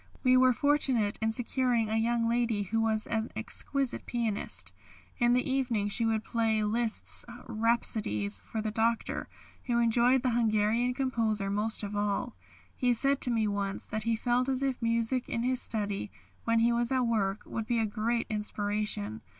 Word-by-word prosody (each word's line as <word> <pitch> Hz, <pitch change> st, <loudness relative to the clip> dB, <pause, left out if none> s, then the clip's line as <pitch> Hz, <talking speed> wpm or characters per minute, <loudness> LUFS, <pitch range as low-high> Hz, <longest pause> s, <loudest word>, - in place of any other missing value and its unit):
We 255 Hz, -1 st, +5 dB
were 255 Hz, 0 st, +6 dB
fortunate 260 Hz, -6 st, +1 dB
in 220 Hz, 0 st, +1 dB
securing 245 Hz, -1 st, +1 dB
a 220 Hz, -, 0 dB
young 230 Hz, +1 st, +1 dB
lady 230 Hz, -3 st, +1 dB
who 225 Hz, +4 st, -1 dB
was 220 Hz, -1 st, +1 dB
an 225 Hz, 0 st, -2 dB
exquisite 255 Hz, +4 st, -2 dB
pianist. 230 Hz, -4 st, -1 dB, 0.5 s
In 240 Hz, 0 st, +4 dB
the 250 Hz, -, +2 dB
evening 245 Hz, -6 st, 0 dB
she 230 Hz, +3 st, +1 dB
would 220 Hz, -1 st, 0 dB
play 225 Hz, -2 st, 0 dB
Liszt's 225 Hz, +1 st, 0 dB, 0.2 s
rhapsodies 215 Hz, -, 0 dB
for 215 Hz, -, -5 dB
the 215 Hz, -, -2 dB
Doctor, 225 Hz, +1 st, -1 dB, 0.4 s
who 240 Hz, -1 st, 0 dB
enjoyed 240 Hz, +2 st, +3 dB
the 255 Hz, -, +2 dB
Hungarian 230 Hz, +1 st, +1 dB
composer 225 Hz, -7 st, 0 dB
most 210 Hz, +2 st, -1 dB
of 205 Hz, 0 st, -4 dB
all. 205 Hz, +3 st, -1 dB, 0.4 s
He 250 Hz, -2 st, +2 dB
said 275 Hz, +4 st, +1 dB
to 250 Hz, -, +1 dB
me 225 Hz, -3 st, +1 dB
once 200 Hz, -1 st, -2 dB
that 215 Hz, +1 st, -4 dB
he 230 Hz, +1 st, 0 dB
felt 245 Hz, +3 st, 0 dB
as 265 Hz, 0 st, 0 dB
if 265 Hz, -2 st, -1 dB
music 230 Hz, +2 st, 0 dB
in 230 Hz, -, -1 dB
his 255 Hz, 0 st, +1 dB
study, 205 Hz, -2 st, -2 dB, 0.4 s
when 230 Hz, 0 st, +2 dB
he 235 Hz, +1 st, +4 dB
was 235 Hz, +1 st, 0 dB
at 260 Hz, -1 st, +2 dB
work, 210 Hz, -4 st, 0 dB
would 225 Hz, -1 st, -5 dB
be 240 Hz, -, +1 dB
a 225 Hz, -, +2 dB
great 230 Hz, +2 st, -1 dB
inspiration. 210 Hz, -, -2 dB
230 Hz, 175 wpm, -30 LUFS, 215-245 Hz, 0.5 s, were